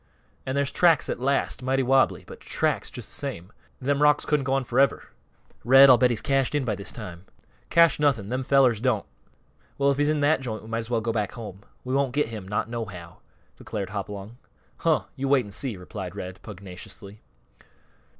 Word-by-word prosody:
"An' 130 - -2
there's 140 -1 0
tracks 165 -4 +3
at - - -2
last 135 +1 0
mighty 130 +1 +1
wobbly, 130 +1 +2
but - - -11
tracks - - -1
just - - -8
th' - - -5
same. 90 +4 -6 0.3
Them 140 +2 0
rocks 150 0 +4
couldn't 150 -3 +1
go 130 - 0
on 135 -1 +1
forever. 130 +3 +1 0.5
Red, 135 +3 +8
I'll 125 - +6
bet 125 - +4
he's 120 -3 -1
cashed 135 0 +1
in 145 -3 0
by 110 - 0
this 100 -3 -5
time." 90 +1 -9 0.4
"Cashed 170 -2 +5
nothing! 125 -9 +1
Them 130 +2 -2
fellers 130 -5 +3
don't." 120 -5 +1 0.7
"Well, 140 0 +3
if 140 - -2
he's 145 0 +2
in 155 -1 +1
that 145 0 +3
joint 110 -5 -5
we 110 - -11
might 115 0 -1
as 115 0 -6
well 115 -2 0
go 115 0 -2
back 105 -3 -2
home. 105 -4 -9 0.2
We 130 - -4
won't 135 -2 +1
get 145 -4 +1
him, 105 -4 -7
not 105 +2 -1
nohow," 100 -8 -7 0.4
declared 100 -2 -5
Hopalong. 100 +3 -6 0.4
"Huh! 160 -2 +1
You 135 -1 -3
wait 135 -3 +3
an' 100 - -11
see!" 115 0 -4
replied 90 0 -7
Red, 95 -2 -7
pugnaciously. 100 +1 -10
125 Hz, 200 wpm, -25 LUFS, 105-135 Hz, 0.7 s, Red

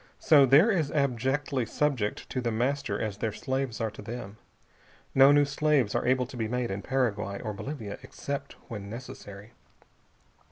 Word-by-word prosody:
So 145 -4 +6
they're 155 - +6
as 160 -8 0
abjectly 135 -1 0
subject 135 -8 -1
to 130 - -1
The 120 -1 -1
Master 120 -2 -1
as 105 -2 -3
their 110 - -1
slaves 130 +2 -3
are 110 -2 -1
to - - -10
them. 110 -1 -7 0.8
No 135 +1 +7
new 145 0 +5
slaves 145 -5 +1
are - - +1
to 125 0 -4
be 110 -2 -1
made 125 -1 -2
in 100 +1 -3
Paraguay 105 -6 -1
or 110 -2 -4
Bolivia, 110 -1 -6
except 140 0 -5
when 105 -4 -7
necessary. 105 -3 -9
125 Hz, 160 wpm, -28 LUFS, 110-140 Hz, 0.8 s, No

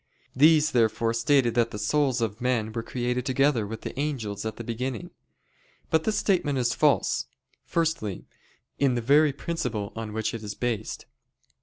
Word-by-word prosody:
These, 155 +2 +5
therefore, 115 -1 +2
stated 120 +1 +3
that 115 0 +2
the - - -6
souls 130 +3 +1
of 110 0 -2
men 120 -3 0
were 115 - -2
created 125 +1 -2
together 130 -4 +2
with 115 +2 -6
the - - -6
angels 110 -8 -3
at 110 - -5
the 115 - -7
beginning. 120 +1 -4 0.8
But 160 0 +2
this 220 - +1
statement 160 -8 +1
is 120 -2 +1
false. - - +2 0.4
Firstly, 160 - -1 0.5
in 135 -3 +3
the 120 - -1
very 145 +5 +5
principle 140 - -3
on 110 -1 -5
which 110 0 -2
it 115 - -5
is 105 -2 -6
based. 115 -3 -3
120 Hz, 165 wpm, -26 LUFS, 110-145 Hz, 0.8 s, These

